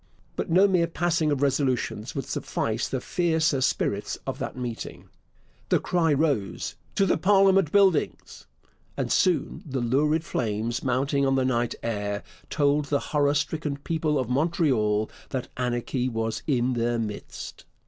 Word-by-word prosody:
But - - -3
no 185 +4 +6
mere 180 -3 +2
passing 165 -2 0
of 145 -1 0
resolutions 130 -5 0
would 135 - -3
suffice 115 +1 -2
the 130 - -2
fiercer 160 -2 +1
spirits 100 -5 0
of 135 -1 -4
that - - -4
meeting. 120 -2 -6 0.6
The - - +4
cry 170 -3 +1
arose 140 -9 -1 0.2
'To 195 - +3
the 175 - +1
Parliament 195 -2 +4
Buildings!' 195 -6 +1 0.5
and - - -2
soon 180 -3 +1
the 135 -4 -3
lurid 150 +6 +2
flames 115 -2 -2
mounting 135 +2 +1
on 135 0 +2
the 130 -1 +2
night 120 -2 0
air 105 -3 -2 0.3
told 145 -1 +2
the 140 0 0
horror 145 -1 +3
stricken 145 0 -1
people 155 0 -1
of 130 -3 -1
Montreal 125 - +1 0.2
that 130 -2 -4
anarchy 125 +1 -1
was 115 -1 -2
in 130 -3 +1
their 120 0 0
midst. 105 -2 -6
140 Hz, 150 wpm, -26 LUFS, 120-160 Hz, 0.6 s, no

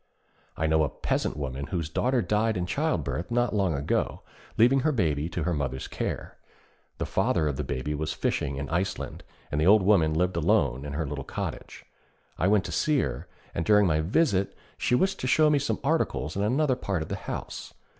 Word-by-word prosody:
I 80 - 0
know 80 0 +3
a 75 - 0
peasant - - -2
woman 70 -1 -4
whose 85 -4 -2
daughter 125 - +1
died 110 0 +1
in 90 - -1
childbirth 85 0 -1
not 120 0 +1
long 95 -6 +1
ago, 70 +1 -1 0.3
leaving 125 +4 +5
her 155 +4 +2
baby 80 - 0
to 85 -1 -3
her 90 - 0
mother's 65 -4 -3
care. - - -4 0.6
The - - -2
father 80 - +1
of 70 - -1
the - - -3
baby 65 +4 -3
was 75 +1 -2
fishing 70 - -1
in 70 +1 -4
Iceland, 90 +4 -2 0.3
and 75 +1 0
the 80 - +3
old 105 0 +6
woman 85 -6 +4
lived 90 +1 +1
alone 75 - +2
in 70 - -5
her 80 +2 -1
little 70 -1 -4
cottage. - - -6 0.5
I 90 - +2
went 100 -2 +3
to - - -5
see 150 -2 +2
her, - - -4 0.3
and 85 - -1
during 105 +2 +5
my 80 -3 +2
visit, 100 - +1 0.2
she 125 - +1
wished 190 +8 +1
to 130 - -2
show 150 +3 +4
me 145 - +3
some - - -1
articles 80 - 0
in 100 - -1
another 130 +6 +2
part 100 -9 -2
of - - -10
the - - -2
house. - - -6
90 Hz, 205 wpm, -27 LUFS, 75-110 Hz, 0.6 s, old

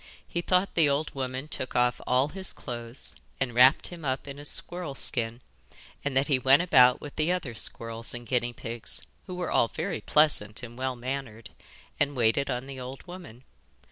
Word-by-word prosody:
He 170 - -2
thought 185 +2 +1
the 160 -4 +4
old 145 +2 -1
woman 130 +1 -4
took 130 -4 -5
off 125 0 +2
all 130 +3 +3
his 190 +3 +3
clothes 120 -1 -7 0.3
and 130 -3 -1
wrapped 125 +4 +6
him 175 -2 -10
up 135 0 -2
in 140 0 -8
a 145 - -9
squirrel 175 -1 0
skin, 120 -2 +2 0.6
and 145 -2 -1
that 135 - +3
he 140 -4 +2
went 135 +5 +5
about 125 -7 +6
with 145 - -10
the 155 +3 +1
other 175 -9 -2
squirrels 115 +1 -4
and 120 0 -7
guinea 120 +1 0
pigs, 115 -1 -5 0.2
who 180 - -6
were 180 -1 -3
all - - +4
very 170 +9 -4
pleasant 135 -9 +2
and 120 -1 -8
well 130 0 -2
mannered, 125 -2 -6 0.5
and 145 -1 +1
waited 120 +3 +2
on 125 +1 -2
the 135 -1 -8
old 130 +1 -8
woman. 175 -10 -11
130 Hz, 190 wpm, -28 LUFS, 120-150 Hz, 0.6 s, wrapped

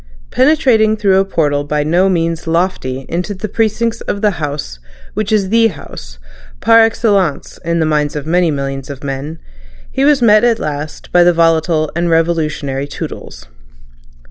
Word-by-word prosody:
Penetrating 255 -7 +3
through 195 -2 +3
a 195 - +2
portal 145 -6 0
by 150 0 -1
no 175 +5 +2
means 165 -2 -1
lofty 160 -6 -1
into 180 +5 -3
the 215 +3 -5
precincts 225 +2 -1
of 200 - -4
the 210 - +4
House 140 - -5 0.3
which 215 -1 -3
is 200 -3 +1
the 230 +1 +4
House, - - -10 0.4
par 230 0 +5
excellence 210 -7 +1
in 170 0 -1
the 160 - +2
minds 150 -1 0
of 150 -1 -4
many 175 +1 +2
millions 135 -2 -4
of 140 0 -8
men, 140 +3 -5 0.5
he 265 - -1
was 290 -1 +4
met 215 -3 +4
at 235 -2 +3
last 150 0 -6
by 175 0 +5
the 175 0 +4
volatile 165 -1 +1
and 170 +1 0
revolutionary 155 -4 -1
Toodles. 60 - -8
170 Hz, 165 wpm, -15 LUFS, 150-210 Hz, 0.5 s, par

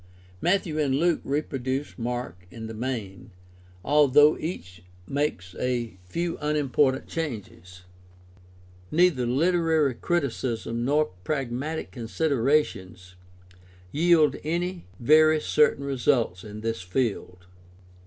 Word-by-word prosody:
Matthew 175 -4 +1
and 140 -3 +1
Luke 170 +3 +2
reproduce 135 -1 -3
Mark 120 -7 -5
in 110 +4 -8
the 110 - -6
main, 110 -6 -5 0.6
although 150 +1 +5
each 90 - -6 0.2
makes 135 -9 -2
a 120 -6 -2
few 170 - -3
unimportant 145 -3 +1
changes. 100 - -6 1.1
Neither 160 -7 +3
Uterary 160 +1 +2
criticism 120 -6 -2
nor 150 +1 +1
pragmatic 140 - -3
considerations 120 - -1 0.8
yield 160 -1 +4
any 175 - -3
very 155 +4 +5
certain 150 -2 +2
results 125 -8 0
in 105 0 -8
this 115 -3 -2
field. 90 -3 -3
135 Hz, 95 wpm, -26 LUFS, 115-155 Hz, 1.1 s, although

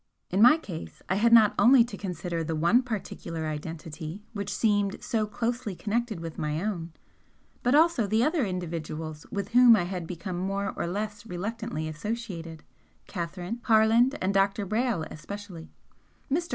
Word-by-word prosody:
In 190 +3 +2
my 250 +7 +8
case 160 - -8
I - - +2
had 230 +3 +3
not 220 -3 +7
only 245 0 +7
to 230 -3 -7
consider 180 -3 -4
the 160 0 -2
one 170 +10 +4
particular 185 -8 -5
identity 160 +3 -6
which 200 -2 -4
seemed 205 -3 +1
so 220 -2 0
closely 230 -1 -3
connected 220 0 -2
with 165 -1 -7
my 150 0 -1
own 175 -4 -3 0.7
but 250 +3 +3
also 310 -8 +4
the 220 +3 +2
other 310 0 +2
individuals 160 -5 -5
with 200 -1 -3
whom 245 -1 +7
I 205 - +1
had 175 -2 -4
become 180 +1 -5
more 195 +2 -2
or - - -2
less 205 +3 -4
reluctantly 200 -2 -4
associated, 165 -2 -5 0.4
Catherine 180 +4 -5
Harland 230 +5 +4
and 190 +1 0
Dr. 195 +1 +2
Brayle 220 -3 0
especially. 180 0 -8 0.6
Mr. 335 +4 0
200 Hz, 155 wpm, -27 LUFS, 170-230 Hz, 0.7 s, my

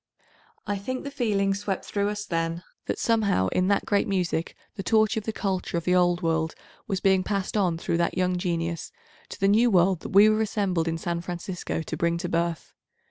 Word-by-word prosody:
I 205 -1 -2
think 255 +6 -4
the 280 - -5
feeling 205 -7 +1
swept 195 -1 -3
through 205 0 -1
us 210 0 -4
then 165 -1 -2 0.2
that - - -1
somehow 205 - +2
in 185 0 +1
that 200 0 +2
great 205 -1 +1
music 180 -4 -1 0.2
the 195 - -5
torch 215 +1 +3
of 220 -2 -3
the - - -3
863 220 - -5
culture 190 -3 -1
of 170 - -2
the 180 - +1
old 175 0 +3
world 160 -1 0 0.3
was 195 -3 -1
being 190 0 +3
passed 195 +1 -2
on 180 -5 +2
through 170 - -1
that 170 0 0
young 180 0 +1
genius, 170 -2 -2 0.4
to - - -9
the 195 - +3
new 225 +4 +5
world 185 -2 +3
that - - -7
we 200 +2 +7
were 215 0 +3
assembled 195 -6 0
in 165 0 -1
San 170 +1 -3
Francisco 175 -1 -4
to 160 - -5
bring 170 +1 +1
to 175 +1 -3
birth. 170 -1 -2
185 Hz, 215 wpm, -26 LUFS, 170-205 Hz, 0.4 s, we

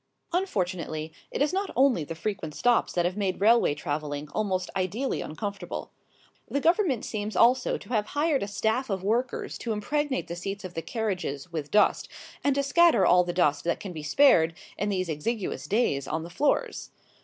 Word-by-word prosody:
Unfortunately, 180 - -2 0.2
it - - 0
is 300 - 0
not 390 +1 -1
only 255 - +4
the 165 +3 -6
frequent 165 -4 -4
stops 245 -1 +2
that 175 -1 +1
have 180 +1 0
made 195 -3 -1
railway 220 -6 +4
travelling 145 0 -4
almost 190 -4 -1
ideally 200 +9 -1
uncomfortable. 200 +5 -5 0.6
The 280 - 0
Government 330 - +2
seems 215 -1 -4
also 245 +5 +4
to - - -14
have 215 -4 0
hired 300 -2 +2
a 200 - -2
staff 220 +5 -1
of 190 -2 -2
workers 240 +5 -1
to 235 - -3
impregnate 280 +6 -1
the 170 - -5
seats 195 +3 -5
of 180 - -7
the 165 - -3
carriages 180 - -3
with 155 -3 -4
dust 210 - +3 0.3
and 280 -1 +2
to 280 - +1
scatter 325 - +5
all 180 +1 +6
the 175 - -3
dust 150 -5 +2
that 170 - 0
can 190 -3 -7
be 155 - -6
spared 165 - +4 0.2
in 205 - -2
these 185 -2 -1
exiguous 180 +7 -3
days 195 - +1
on 160 +1 -2
the 170 - -9
floors. 295 - 0
200 Hz, 185 wpm, -27 LUFS, 170-245 Hz, 0.6 s, all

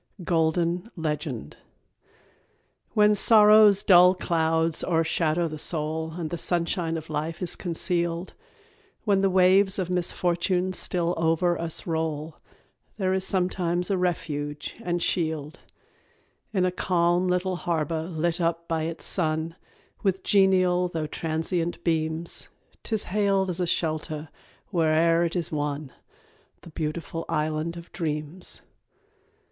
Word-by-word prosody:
Golden 170 +3 0
Legend. 150 - -4 1.4
When 210 0 +5
sorrow's 210 -1 +6
dull 180 0 +7
clouds 165 -2 0
o'ershadow 165 0 +1
the 155 -1 -7
soul, 160 0 -2
And 165 -2 -5
the 170 - -3
sunshine 170 -1 -1
of 160 0 -8
life 155 +2 -3
is 180 - -2
concealed, 170 0 -2 0.7
When 200 -3 +2
the 195 - +3
waves 190 +1 +4
of 185 -2 -2
misfortune 180 +1 0
still 175 -2 0
over 165 +2 +2
us 165 -1 -4
roll, 160 -2 -3 0.6
There 190 -2 0
is 190 0 0
sometimes 180 -1 0
a 195 - +2
refuge 150 -4 -3
and 175 -3 -1
shield, 160 -2 -2 0.9
In 190 -4 +1
a 180 - +1
calm 175 0 +1
little 180 0 0
harbour 165 -2 -1
lit 170 +1 -2
up 170 0 -1
by 160 -1 -1
its 165 0 -5
sun, 160 -1 -1 0.5
With 190 -2 0
genial 185 -2 +3
though 165 -3 -3
transient 165 +2 -2
beams, 160 0 -1 0.3
'Tis 220 -2 -1
hailed 195 -1 +1
as 175 - -5
a 180 - 0
shelter 155 -2 -2 0.4
whene'er 165 0 +3
it 170 - -3
is 175 -2 -2
won 145 -2 -3 0.7
The 170 - -13
Beautiful 165 +1 -4
Island 155 +2 -1
of 170 0 -11
Dreams. 160 0 -5
170 Hz, 125 wpm, -26 LUFS, 160-180 Hz, 1.4 s, dull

